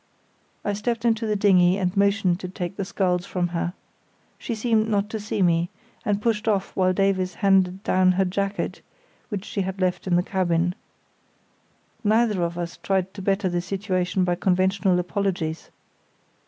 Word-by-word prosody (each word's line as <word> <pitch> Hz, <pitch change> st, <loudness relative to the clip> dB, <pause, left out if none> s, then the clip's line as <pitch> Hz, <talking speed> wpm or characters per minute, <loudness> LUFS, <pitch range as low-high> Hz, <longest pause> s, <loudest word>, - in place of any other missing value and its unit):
I 205 Hz, -, 0 dB
stepped 230 Hz, +3 st, -2 dB
into 225 Hz, -1 st, +2 dB
the 210 Hz, -, +1 dB
dinghy 185 Hz, -2 st, +4 dB
and 185 Hz, -1 st, -1 dB
motioned 200 Hz, -3 st, +2 dB
to 185 Hz, -, -6 dB
take 180 Hz, 0 st, -5 dB
the 195 Hz, -, -3 dB
sculls 180 Hz, -2 st, 0 dB
from 180 Hz, -2 st, -2 dB
her. 175 Hz, 0 st, -2 dB, 0.7 s
She 235 Hz, -, -3 dB
seemed 220 Hz, -1 st, +1 dB
not 205 Hz, 0 st, 0 dB
to 220 Hz, -, -3 dB
see 210 Hz, -1 st, -1 dB
me, 170 Hz, 0 st, +2 dB, 0.3 s
and 205 Hz, -1 st, 0 dB
pushed 220 Hz, 0 st, -1 dB
off 200 Hz, -3 st, 0 dB
while 185 Hz, -1 st, +3 dB
Davies 185 Hz, -1 st, +1 dB
handed 190 Hz, -1 st, +2 dB
down 185 Hz, -3 st, +3 dB
her 190 Hz, +1 st, +2 dB
jacket, 200 Hz, +2 st, -2 dB, 0.5 s
which 205 Hz, -3 st, -4 dB
she 205 Hz, -, -2 dB
had 190 Hz, +1 st, -4 dB
left 185 Hz, 0 st, -1 dB
in 175 Hz, -, +2 dB
the 175 Hz, -, +3 dB
cabin. 175 Hz, -2 st, 0 dB, 1.3 s
Neither 215 Hz, -2 st, +2 dB
of 170 Hz, 0 st, -1 dB
us 170 Hz, -1 st, -4 dB
tried 190 Hz, -1 st, -1 dB
to 200 Hz, -, -8 dB
better 195 Hz, +1 st, +1 dB
the 175 Hz, -1 st, -1 dB
situation 185 Hz, 0 st, -1 dB
by 180 Hz, -1 st, +1 dB
conventional 185 Hz, +1 st, +2 dB
apologies. 180 Hz, -3 st, -2 dB
190 Hz, 170 wpm, -24 LUFS, 180-205 Hz, 1.3 s, dinghy